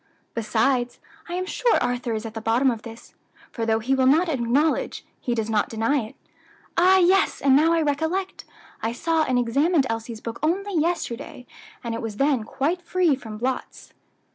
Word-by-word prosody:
Besides, 240 +3 0 0.3
I - - -4
am 370 +1 -2
sure 475 +5 +1
Arthur 245 -1 -1
is 220 +1 -4
at 220 - -6
the 225 - -6
bottom 235 +4 +2
of 225 -2 -5
this, 230 0 -12 0.4
for 230 -2 -3
though 220 0 +3
he 235 +4 -1
will 260 -1 +3
not 325 +6 +4
acknowledge, 275 +3 0
he 240 - -2
does 220 -2 -1
not 215 -2 0
deny 225 +6 0
it. 220 -2 -7 0.6
Ah! 370 +2 +5
yes, 375 +1 +3
and 270 -1 +4
now 315 +4 +4
I 330 -1 +2
recollect, 320 +6 -2 0.4
I 225 +1 -1
saw 325 +6 0
and 255 -3 +1
examined 275 +6 +2
Elsie's 225 0 -5
book 230 0 -6
only 390 +6 0
yesterday, 310 -7 -2 0.4
and 235 -1 -3
it 230 - -4
was 220 -2 -5
then 275 -5 +1
quite 315 +10 -1
free 350 -3 +2
from 220 -5 -9
blots." 255 +3 -4
260 Hz, 185 wpm, -24 LUFS, 230-325 Hz, 0.6 s, Ah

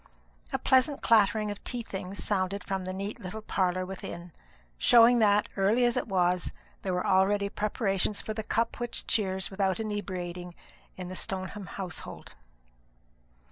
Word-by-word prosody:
A - - +1
pleasant 265 +2 +3
clattering 215 -1 +4
of 205 - -8
tea 245 -2 -3
things 190 -2 -6
sounded 200 -1 -1
from 190 -1 -3
the 185 - -3
neat 200 +5 -5
little 215 +2 -7
parlour 185 -3 0
within, 180 -2 -7 0.5
showing 240 0 +7
that, 210 -1 +4
early 210 +6 +3
as 240 - +2
it - - -1
was, 180 -3 +1 0.3
there 190 - -2
were 180 - -1
already 200 +1 +3
preparations 205 -1 0
for 215 - -3
the 220 - -3
cup 230 +2 -1
which 240 -1 -3
cheers 190 -4 0
without 190 +1 0
inebriating 180 -5 -4 0.4
in 185 -1 -6
the 185 - -6
Stoneham 190 +1 -3
household. 185 -3 -6
195 Hz, 150 wpm, -29 LUFS, 185-215 Hz, 0.5 s, showing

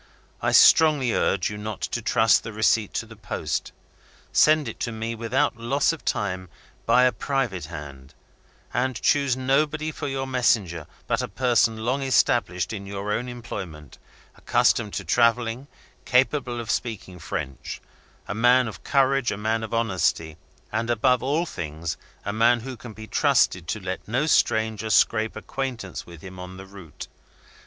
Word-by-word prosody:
I - - +1
strongly 150 -7 +6
urge 100 - +1
you 105 - -6
not 105 -1 -5
to - - -2
trust 110 -3 +4
the 115 - -7
receipt 110 0 +2
to - - -1
the 115 0 -13
post. 100 -3 -4 0.6
Send 155 -2 +4
it 115 - -7
to 115 - -2
me, 115 +1 -4
without 115 +4 0
loss 135 +7 +1
of 165 - -9
time, 95 -3 -2 0.4
by 120 +2 +5
a 125 - +5
private 125 -10 -2
hand, 70 -4 -10 0.6
and 125 +1 -1
choose 140 -3 +2
nobody 150 +4 +1
for 150 - -5
your 135 -1 -2
messenger 110 - +1 0.2
but - - 0
a - - -3
person 115 -3 +1
long 130 +3 0
established 120 -8 +1
in 100 -2 -6
your 100 +1 -4
own 125 +3 -2
employment, 95 - -8 0.4
accustomed 105 -4 +1
to 95 - -4
travelling, 115 - +1 0.4
capable 125 -1 +1
of 120 0 -3
speaking 100 -6 -4
French; 65 -4 -5 0.5
a - - -3
man 120 +3 +4
of 110 - -9
courage, 135 -2 +2
a - - -3
man 110 +2 -1
of 110 - -6
honesty, 95 -8 0 0.4
and, 110 +2 -2
above 125 +2 +2
all 145 +7 0
things, 80 - -5 0.3
a 100 - -2
man 115 +2 +3
who 130 +2 -6
can 120 -1 -10
be 110 +1 -9
trusted 90 -5 +2
to 105 - -2
let 95 -1 -5
no 130 +7 0
stranger 110 -7 +1
scrape 110 +1 +3
acquaintance 130 -8 -5
with 85 -3 -12
him 95 -1 -10
on 90 +1 -8
the 95 - -9
route. 95 -5 -11
115 Hz, 165 wpm, -24 LUFS, 100-125 Hz, 0.6 s, strongly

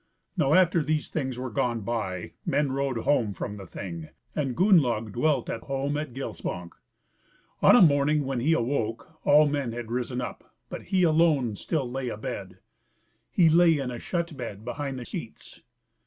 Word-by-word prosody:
Now 155 -4 +3
after 180 -3 +4
these 150 +1 -1
things 130 -5 -2
were 130 -1 -4
gone 120 +1 0
by 100 -5 -3
men 145 -2 +1
rode 135 -2 -1
home 115 -4 +1
from 105 +4 -5
the 95 -2 -9
Thing, 85 -3 -7 0.3
and 135 -5 -2
Gunnlaug 130 - +3
dwelt 135 +2 +1
at 115 - -4
home 140 +1 -2
at 150 -2 -3
Gilsbank. 90 -9 -5 0.9
On - - +7
a 245 - +8
morning 145 -1 +3
when 135 -2 -2
he 150 +7 +2
awoke 120 +3 -2
all 150 +1 +7
men 140 -5 -1
had 120 -1 -6
risen 125 0 -2
up, 125 - -7
but - - -7
he 185 -2 +2
alone 155 -8 +3
still 145 - -2
lay 130 0 -3
abed; 110 -1 -6 0.7
he 175 - +4
lay 165 0 +5
in 135 -3 -3
a 120 - -6
shut 170 -2 -3
bed 115 -5 -7
behind 135 +2 -4
the 125 - -6
seats. - - -8
135 Hz, 170 wpm, -27 LUFS, 115-155 Hz, 0.9 s, a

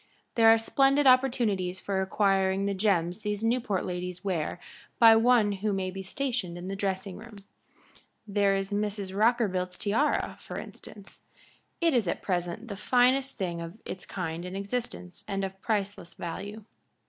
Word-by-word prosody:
"There 225 -1 +6
are 225 - +7
splendid 275 +5 +3
opportunities 235 -8 +3
for 195 -1 -1
acquiring 195 0 +1
the 200 - 0
gems 185 -3 +1
these 210 0 -3
Newport 230 -4 0
ladies 180 +1 -5
wear 175 -3 -2 0.4
by 225 -2 +8
one 225 -2 +4
who 205 +2 -1
may 190 -1 -2
be 190 +1 -6
stationed 225 - -3
in 175 +1 -7
the 195 - -3
dressing 195 -1 -3
room. 225 0 -11 0.9
There 200 -1 +2
is 195 +1 -2
Mrs. 205 -2 -2
Rockerbilt's 200 -5 +1
tiara, 225 +9 0
for - - -8
instance. 205 -1 -11 0.6
It 335 -2 +3
is 235 -7 +2
at - - -2
present 180 +4 -2
the 200 - -5
finest 255 +5 +2
thing 175 -3 -3
of 170 +4 -8
its 185 - -7
kind 170 -3 -4
in 180 +1 -6
existence 200 -2 -5
and 195 0 -1
of 190 0 -8
priceless 205 -5 -2
value. 205 +6 -6
200 Hz, 160 wpm, -28 LUFS, 185-225 Hz, 0.9 s, by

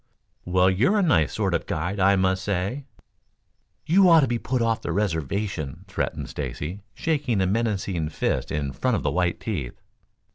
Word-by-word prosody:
"Well, 90 +1 +3
you're 130 - +2
a 205 - +3
nice 85 - +2
sort 100 -4 0
of 85 - +1
a - - -22
guide, 85 +5 -3
I 95 +1 +5
must 95 0 +1
say." 100 +8 -2 1.0
"You 185 +3 +5
ought 165 -2 +7
to 135 - +2
be 120 -1 -1
put 130 +2 -1
off 115 -1 +1
the - - -3
reservation," 85 -4 -2
threatened - - -3
Stacy, 90 +7 -5
shaking 145 -9 0
a 95 - +2
menacing 95 -6 -1
fist 80 - -2
in 70 -2 -2
front 125 - 0
of - - -2
the - - +1
white 90 -1 0
teeth. 75 - -4
100 Hz, 180 wpm, -24 LUFS, 90-120 Hz, 1.0 s, ought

